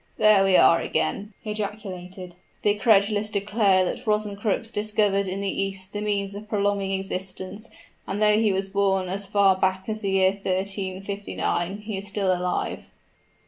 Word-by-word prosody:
"There 215 Hz, -2 st, +5 dB
we 195 Hz, -1 st, +5 dB
are 165 Hz, -, +6 dB
again!" 205 Hz, +1 st, -2 dB
he 215 Hz, -, -4 dB
ejaculated. 190 Hz, -4 st, -6 dB, 0.3 s
"The 205 Hz, -, +4 dB
credulous 210 Hz, -1 st, +3 dB
declare 200 Hz, -2 st, +2 dB
that 235 Hz, +6 st, -5 dB
Rosencrux 210 Hz, +1 st, -1 dB
discovered 210 Hz, -2 st, +1 dB
in 190 Hz, +2 st, -3 dB
the 195 Hz, 0 st, -1 dB
East 195 Hz, 0 st, -3 dB
the 205 Hz, -, -3 dB
means 200 Hz, -1 st, -1 dB
of 210 Hz, +1 st, -9 dB
prolonging 200 Hz, -2 st, 0 dB
existence, 190 Hz, +2 st, -5 dB, 0.4 s
and 200 Hz, -, -3 dB
though 210 Hz, 0 st, +4 dB
he 220 Hz, -2 st, +3 dB
was 190 Hz, 0 st, -1 dB
born 195 Hz, -1 st, +1 dB
as 195 Hz, +1 st, -3 dB
far 195 Hz, -1 st, +4 dB
back 190 Hz, 0 st, 0 dB
as 215 Hz, -1 st, -3 dB
the 200 Hz, -, -1 dB
year 190 Hz, -1 st, +4 dB
1359, 195 Hz, -1 st, -3 dB
he 210 Hz, -1 st, -5 dB
is 195 Hz, +1 st, -4 dB
still 195 Hz, -2 st, 0 dB
alive." 180 Hz, 0 st, -3 dB
200 Hz, 160 wpm, -25 LUFS, 190-210 Hz, 0.4 s, are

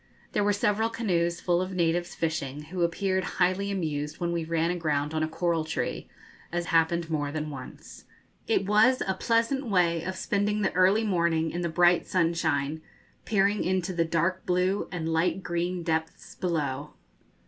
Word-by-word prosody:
There 205 Hz, -, +1 dB
were 205 Hz, -, +3 dB
several 210 Hz, +2 st, +1 dB
canoes 175 Hz, -7 st, 0 dB
full 175 Hz, 0 st, +1 dB
of 185 Hz, +1 st, -4 dB
natives 175 Hz, 0 st, 0 dB
fishing, 150 Hz, -3 st, -2 dB
who 185 Hz, -1 st, -3 dB
appeared 190 Hz, +2 st, +1 dB
highly 185 Hz, +2 st, +2 dB
amused 155 Hz, -6 st, -3 dB
when 170 Hz, -1 st, -1 dB
we 170 Hz, -1 st, -1 dB
ran 165 Hz, +1 st, 0 dB
aground 150 Hz, -4 st, -1 dB
on 155 Hz, -, 0 dB
a 155 Hz, -, +1 dB
coral 165 Hz, 0 st, 0 dB
tree, 160 Hz, +1 st, -3 dB, 0.4 s
as 175 Hz, 0 st, -2 dB
happened 165 Hz, 0 st, +2 dB
more 145 Hz, -2 st, -1 dB
than 155 Hz, 0 st, -3 dB
once. 130 Hz, -3 st, -10 dB, 0.4 s
It 225 Hz, -3 st, +2 dB
was 215 Hz, +6 st, +4 dB
a 190 Hz, -, +1 dB
pleasant 230 Hz, +6 st, 0 dB
way 175 Hz, -5 st, +2 dB
of 185 Hz, +1 st, -4 dB
spending 205 Hz, +2 st, 0 dB
the 190 Hz, -, 0 dB
early 190 Hz, +4 st, +4 dB
morning 170 Hz, -5 st, +1 dB
in 175 Hz, -, -3 dB
the 170 Hz, -, -1 dB
bright 175 Hz, +1 st, +3 dB
sunshine, 160 Hz, -4 st, 0 dB, 0.4 s
peering 205 Hz, -1 st, +2 dB
into 185 Hz, 0 st, 0 dB
the 170 Hz, -1 st, +2 dB
dark 170 Hz, +3 st, 0 dB
blue 185 Hz, +3 st, +1 dB
and 170 Hz, -3 st, -3 dB
light 165 Hz, +3 st, 0 dB
green 175 Hz, +1 st, -2 dB
depths 160 Hz, -1 st, -3 dB
below. 150 Hz, -5 st, -2 dB
175 Hz, 170 wpm, -27 LUFS, 160-190 Hz, 0.4 s, was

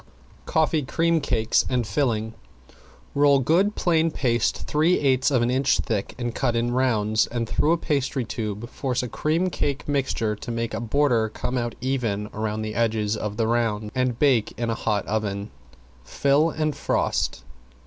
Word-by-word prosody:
~COFFEE 160 Hz, 0 st, +2 dB
CREAM 165 Hz, +1 st, +1 dB
CAKES 115 Hz, -5 st, +1 dB
AND 125 Hz, -2 st, 0 dB
FILLING~ 110 Hz, 0 st, -1 dB, 0.8 s
Roll 140 Hz, 0 st, +5 dB
good 175 Hz, -, +2 dB
plain 165 Hz, -2 st, +2 dB
paste 120 Hz, -7 st, 0 dB
three 160 Hz, +4 st, +2 dB
eighths 135 Hz, -2 st, +2 dB
of 130 Hz, -4 st, +2 dB
an 120 Hz, -, +1 dB
inch 135 Hz, +1 st, +2 dB
thick 110 Hz, -5 st, -2 dB
and 120 Hz, -1 st, -3 dB
cut 120 Hz, -, 0 dB
in 120 Hz, +1 st, 0 dB
rounds 110 Hz, -4 st, +2 dB
and 120 Hz, -1 st, -3 dB
through 150 Hz, -, +1 dB
a 170 Hz, -, +3 dB
pastry 140 Hz, -5 st, -1 dB
tube 110 Hz, 0 st, -4 dB
force 125 Hz, 0 st, -2 dB
a -, -, -3 dB
cream 165 Hz, +9 st, 0 dB
cake 140 Hz, -4 st, -2 dB
mixture 130 Hz, -6 st, 0 dB
to 105 Hz, -, -9 dB
make 115 Hz, 0 st, -3 dB
a -, -, -2 dB
border 120 Hz, -2 st, +1 dB
come 125 Hz, +3 st, -4 dB
out 120 Hz, -2 st, -2 dB
even 120 Hz, -6 st, -1 dB
with 110 Hz, 0 st, -2 dB
the 110 Hz, 0 st, -4 dB
edge 110 Hz, -1 st, 0 dB
of 105 Hz, -1 st, -4 dB
the 115 Hz, -, +1 dB
round, 110 Hz, -2 st, 0 dB
and 125 Hz, -2 st, 0 dB
bake 130 Hz, -7 st, +3 dB
in 120 Hz, -1 st, -1 dB
a -, -, +1 dB
hot 105 Hz, -2 st, -1 dB
oven. 100 Hz, -1 st, -2 dB, 0.5 s
Fill 140 Hz, -, +2 dB
and 155 Hz, -2 st, -1 dB
frost. -, -, -1 dB
120 Hz, 170 wpm, -24 LUFS, 110-140 Hz, 0.8 s, Roll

